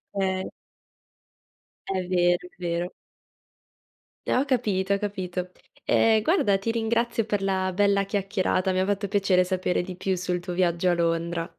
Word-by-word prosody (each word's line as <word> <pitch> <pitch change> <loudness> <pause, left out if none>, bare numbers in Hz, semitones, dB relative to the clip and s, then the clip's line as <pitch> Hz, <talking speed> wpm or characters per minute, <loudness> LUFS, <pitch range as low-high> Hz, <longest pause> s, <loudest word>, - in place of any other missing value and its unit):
Okay. 190 -1 0 1.4
È 190 -1 -2
vero, 175 -1 +2
è - - -24
vero. 175 0 -2 1.4
Eh, - - +1
ho 270 - +2
capito, 205 -7 0
ho - - +2
capito. 185 -3 -4 0.3
Ehm, 220 -1 +4
guarda 215 - +2
ti 225 +4 -2
ringrazio 230 0 0
per 205 -2 -1
la 190 -1 0
bella 200 0 +2
chiacchierata. 195 -2 0
Mi 185 - 0
ha 190 - +2
fatto 200 -1 -1
piacere 195 -3 +3
sapere 180 -1 0
di 180 0 -7
più 190 0 -1
sul 180 0 -2
tuo 175 0 -6
viaggio 175 0 +1
a - - +3
Londra. 170 0 -1
190 Hz, 155 wpm, -25 LUFS, 180-205 Hz, 1.4 s, Ehm